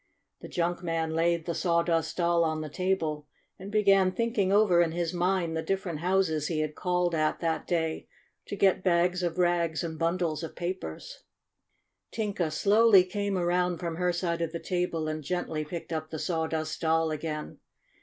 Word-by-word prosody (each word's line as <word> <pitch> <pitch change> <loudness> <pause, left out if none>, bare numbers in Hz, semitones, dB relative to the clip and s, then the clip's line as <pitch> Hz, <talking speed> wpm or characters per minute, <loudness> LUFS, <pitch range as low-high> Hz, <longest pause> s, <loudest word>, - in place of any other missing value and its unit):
The - - -9
junk 175 0 -1
man 165 -2 -2
laid 170 0 +1
the 170 - -2
Sawdust 170 -2 0
Doll 170 -1 +3
on 155 -1 -1
the 155 - -5
table, 160 -5 -1 0.3
and 190 +2 -8
began 195 -3 +4
thinking 220 -3 0
over 200 -4 +5
in 165 -2 +1
his 170 -1 -2
mind 175 -2 0
the 160 - -1
different 190 -4 -2
houses 170 -4 +1
he 155 -2 -1
had 155 0 -2
called 180 +1 0
at 155 -1 0
that 165 -1 -1
day 160 -2 -1 0.4
to - - -4
get 190 -1 +2
bags 180 0 +2
of 175 -1 -2
rags 175 -2 +1
and 160 -2 -5
bundles 165 -1 0
of 165 - -7
papers. 175 - -5 0.9
Tinka 200 -7 -2
slowly 205 +4 +5
came 200 +1 -2
around 180 0 +1
from 165 -1 -4
her 180 0 +1
side 170 -1 -2
of 165 -1 -1
the 170 - -4
table, 175 -4 -2
and 155 0 -3
gently 160 -1 -2
picked 165 +2 -6
up 155 -1 -3
the 160 - -5
Sawdust 160 -1 -2
Doll 160 0 +2
again. 155 0 -5
170 Hz, 175 wpm, -28 LUFS, 160-180 Hz, 0.9 s, over